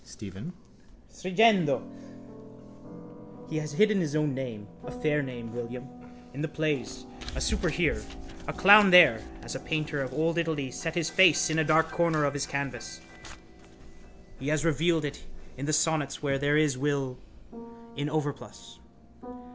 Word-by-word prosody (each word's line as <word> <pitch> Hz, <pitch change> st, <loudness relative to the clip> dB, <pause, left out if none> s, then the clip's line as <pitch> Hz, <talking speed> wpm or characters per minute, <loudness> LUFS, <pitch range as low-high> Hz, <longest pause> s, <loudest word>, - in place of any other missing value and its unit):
STEPHEN: 95 Hz, -, -9 dB, 0.6 s
(Stringendo) 185 Hz, -5 st, +2 dB, 1.6 s
He 155 Hz, -, -4 dB
has 150 Hz, -1 st, -4 dB
hidden 215 Hz, +4 st, +3 dB
his 155 Hz, -4 st, -2 dB
own 150 Hz, -2 st, 0 dB
name, 120 Hz, -6 st, -6 dB, 0.2 s
a -, -, -8 dB
fair 155 Hz, -12 st, -1 dB
name, 120 Hz, -4 st, -7 dB
William, 120 Hz, +1 st, -6 dB, 0.5 s
in 140 Hz, -, -6 dB
the 160 Hz, -, -1 dB
plays, 135 Hz, -5 st, -3 dB, 0.3 s
a -, -, -3 dB
super -, -, 0 dB
here, -, -, 0 dB, 0.5 s
a -, -, -3 dB
clown 205 Hz, +1 st, +7 dB
there, 160 Hz, -12 st, +7 dB, 0.2 s
as -, -, -7 dB
a -, -, -5 dB
painter 150 Hz, -2 st, -3 dB
of 130 Hz, -1 st, -4 dB
old 165 Hz, +4 st, 0 dB
Italy 155 Hz, -6 st, -2 dB
set 165 Hz, +5 st, -5 dB
his 170 Hz, -2 st, -1 dB
face 175 Hz, -4 st, +5 dB
in 155 Hz, -, +1 dB
a -, -, +3 dB
dark 160 Hz, +1 st, +2 dB
corner 165 Hz, -3 st, +1 dB
of 140 Hz, -, -1 dB
his 145 Hz, 0 st, -3 dB
canvas. 125 Hz, -11 st, -5 dB, 1.4 s
He 135 Hz, -, -6 dB
has 155 Hz, +1 st, 0 dB
revealed 165 Hz, 0 st, +1 dB
it 145 Hz, -, -6 dB, 0.3 s
in 140 Hz, +3 st, -6 dB
the -, -, 0 dB
sonnets 155 Hz, -3 st, 0 dB
where 135 Hz, -1 st, 0 dB
there 145 Hz, +1 st, +2 dB
is 150 Hz, -4 st, +1 dB
Will 135 Hz, -3 st, -2 dB, 0.8 s
in 145 Hz, +1 st, -3 dB
overplus. 150 Hz, -2 st, -5 dB
150 Hz, 155 wpm, -28 LUFS, 135-160 Hz, 1.6 s, clown